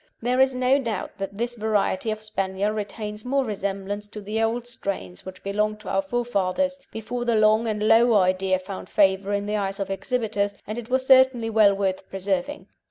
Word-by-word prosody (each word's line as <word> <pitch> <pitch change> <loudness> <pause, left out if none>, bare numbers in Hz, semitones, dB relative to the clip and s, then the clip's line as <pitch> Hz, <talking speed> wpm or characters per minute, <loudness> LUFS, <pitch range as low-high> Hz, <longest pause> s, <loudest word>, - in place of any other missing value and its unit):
There 250 +2 0
is 265 -1 +4
no 255 +2 +3
doubt 230 -8 -4
that 195 0 -4
this 235 +3 -2
variety 215 -2 0
of 215 0 -3
Spaniel 195 -1 -1
retains 210 0 -5
more 270 +1 0
resemblance 200 -1 -4
to 210 +1 -8
the 210 +2 -2
old 230 +2 0
strains 195 - -5
which 190 0 -10
belonged 210 +2 -1
to - - -8
our - - +1
forefathers, 245 0 -1
before 235 +3 -4
the 235 -1 +1
long 215 +1 +4
and 215 -1 -1
low 230 +1 +5
idea 185 -1 +3
found 185 +1 -8
favour 195 0 +2
in 200 0 -1
the 210 +1 -1
eyes 195 -1 -2
of 195 -1 -3
exhibitors, 205 -2 -1
and 215 +3 -4
it 235 0 -9
was 260 0 +1
certainly 260 -3 +5
well 210 -2 +5
worth 195 -1 -2
preserving. 195 +8 -2
215 Hz, 190 wpm, -24 LUFS, 195-240 Hz, -, low